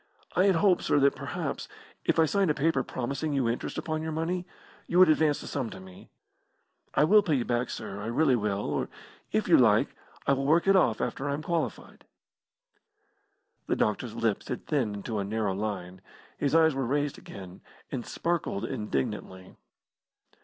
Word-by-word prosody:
I 185 - +4
had 195 -2 +4
hoped, 180 +1 +3
sir, - - +2
that 140 0 +4
perhaps, - - -4 0.4
if - - +2
I 160 - +6
signed 195 +2 +1
a 150 - +2
paper 160 +3 +2
promising 140 +4 -3
you 135 -4 +1
interest 115 +1 -3
upon 155 -1 -2
your 160 0 -3
money, 175 +3 -2 0.4
you 175 - 0
would 185 -2 +8
advance 155 -1 +3
this - - -8
sum 130 -5 -2
to - - -9
me. 95 -1 -14 0.9
I - - +5
will 210 +7 +6
pay 165 -7 +1
you 125 -3 0
back, 120 0 0
sir, 100 +1 -6
I 105 - -5
really 130 +3 +3
will. 105 -3 -1
Or, - - -2 0.4
if - - 0
you - - +6
like, - - +4 0.4
I 140 - +4
will 135 0 -1
work 165 +3 +4
it 195 0 +5
off 125 - +3
after 140 +2 -2
I 140 - 0
am 150 - -6
qualified." 170 +1 -3 1.6
The - - +1
doctor's - - -1
lips - - -1
had - - -5
thinned 125 -10 0
into 105 +2 -4
a - - -1
narrow 105 -1 -1
line. 95 -3 -4 0.3
His 145 +2 0
eyes 160 -1 +5
were 135 -2 -2
raised 145 +2 -1
again, 95 -2 -11 0.3
and 125 - -3
sparkled 170 -12 -2
indignantly. 95 - -4
140 Hz, 185 wpm, -28 LUFS, 110-160 Hz, 1.6 s, would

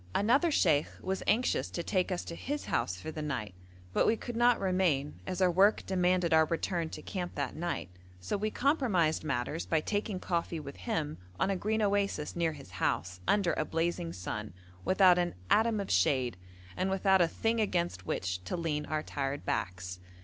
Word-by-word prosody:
Another 260 +11 +4
sheikh 160 - +3
was 190 0 -2
anxious 240 +4 +2
to 170 - -4
take 185 0 0
us 180 - -2
to - - -6
his 290 - -4
house 90 - 0
for 160 - -6
the 155 - -5
night, 130 -10 -3 0.4
but - - +3
we 225 - +3
could 240 +1 -6
not 240 0 +4
remain, 180 -7 +1
as 185 0 0
our 180 - +4
work 195 +5 +4
demanded 180 -2 +2
our 160 0 +6
return 165 +1 -1
to 155 - -8
camp 180 -3 -4
that 140 -3 -2
night, 170 - -3 0.3
so 90 - -2
we 210 +2 -1
compromised 220 - +1
matters 145 +2 -2
by 160 - +2
taking 205 +3 -2
coffee 170 -2 -2
with 140 -2 -8
him 160 - -3 0.2
on 195 - +2
a - - +1
green 215 +3 0
oasis 200 -6 0
near 165 -2 +1
his 140 -9 -12
house, 90 +1 -1
under 195 -4 +3
a - - 0
blazing 165 - -1
sun, 90 +3 -5 0.3
without 185 - +5
an 175 - -1 0.2
atom 220 0 +4
of 200 - -3
shade, 120 +5 +2 0.4
and 185 +1 0
without 190 0 +3
a 170 - +5
thing 225 +6 0
against 175 - -1
which 90 -1 -2
to 180 - -3
lean 155 -3 -2
our 155 0 -1
tired 140 0 -3
backs. 90 -8 -3
170 Hz, 190 wpm, -31 LUFS, 145-195 Hz, 0.4 s, our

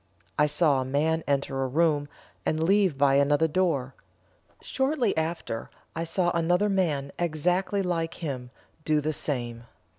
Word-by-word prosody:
I 150 - +5
saw 150 -2 +3
a - - -1
man 155 +5 0
enter 140 -1 0
a 135 - 0
room, 145 0 +1 0.3
and 160 0 0
leave 190 -3 +3
by 140 0 +4
another 145 +3 +3
door. 150 -6 0 0.7
Shortly 265 -4 0
after, 160 -8 -3 0.3
I 165 0 -2
saw 175 +1 +1
another 175 +5 +2
man 155 -8 0
exactly 180 +4 0
like 165 -2 -2
him 130 -7 -5 0.3
do 155 -1 +2
the 155 +1 -1
same. 120 -5 -3
155 Hz, 145 wpm, -27 LUFS, 140-175 Hz, 0.7 s, I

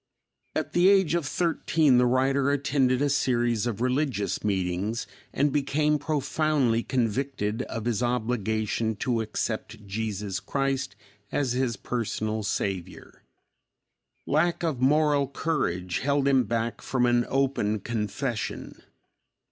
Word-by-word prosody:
At - - -2
the 175 +2 +5
age 190 -5 +4
of 170 -4 0
thirteen, 160 -5 +2
the 125 - +4
writer 135 +2 +2
attended 140 -2 +2
a - - +3
series 120 -4 +1
of 115 -2 -3
religious 125 - 0
meetings 100 +3 -1 0.3
and 145 +1 +1
became 150 +1 +1
profoundly 145 -4 +1
convicted 120 -2 -1
of 115 -1 -4
his 120 -2 0
obligation 110 -2 -1
to 115 +1 -1
accept 110 0 -4
Jesus 100 -2 -3
Christ 135 +2 -2 0.4
as 135 -4 0
his 125 -3 0
personal 110 -2 -2
Savior. 95 -3 -4 1.0
Lack 170 +4 +1
of 155 -7 -1
moral 145 0 +3
courage 95 - -1
held 140 0 +1
him 135 -3 +4
back 115 +1 -2
from 125 -2 0
an 120 0 +3
open 130 -6 +1
confession. 115 +3 -4
125 Hz, 120 wpm, -27 LUFS, 110-140 Hz, 1.0 s, the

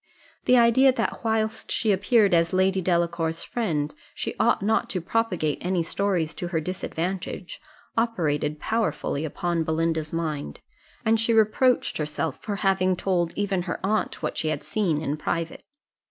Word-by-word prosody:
The 250 - +5
idea 240 +3 +6
that 255 - -2
whilst 220 -1 -1
she 220 - +2
appeared 205 +1 +3
as 165 0 +3
Lady 190 +1 +2
Delacour's 170 -2 0
friend 155 -11 -2 0.2
she - - -3
ought - - +3
not 220 +3 +1
to 190 - -1
propagate 180 -5 0
any 180 -1 0
stories 175 -3 0
to 175 - -5
her 170 -2 0
disadvantage, 180 +2 -4 0.3
operated 155 -10 0
powerfully 220 -7 -1
upon 170 +2 -1
Belinda's 160 -1 -1
mind, 155 - -3 0.5
and 220 0 +3
she 225 +1 +2
reproached 225 +3 +3
herself 150 -1 -2
for 205 - -3
having 190 -2 +2
told 175 -2 0
even 200 -3 0
her - - -2
aunt 215 +2 -1
what - - -2
she 160 - -1
had 155 -2 -1
seen 170 -8 0
in 150 0 -1
private. 165 +2 -3
180 Hz, 155 wpm, -25 LUFS, 160-215 Hz, 0.5 s, idea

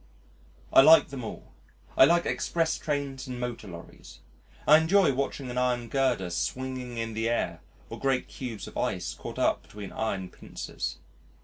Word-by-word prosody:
I - - +9
like 160 +3 +7
them 135 -3 -6
all. 110 - -8 0.4
I - - +8
like 170 +4 +3
express 165 -1 0
trains 140 -3 -3
and 125 -1 -5
motor 120 -3 -4
lorries. 85 -2 -11 0.5
I 155 +1 +9
enjoy 170 -1 +4
watching 135 -1 -3
an 125 - -1
iron 125 -2 0
girder 125 -9 +1
swinging 125 +4 -3
in 115 -1 -3
the 115 +1 -1
air 85 -7 -1 0.3
or 115 - -8
great 135 0 0
cubes 115 -6 -6
of - - -11
ice - - -2
caught - - -8
up - - +2
between 100 -2 -9
iron 95 -4 -3
pincers. - - -6
125 Hz, 165 wpm, -28 LUFS, 115-140 Hz, 0.5 s, I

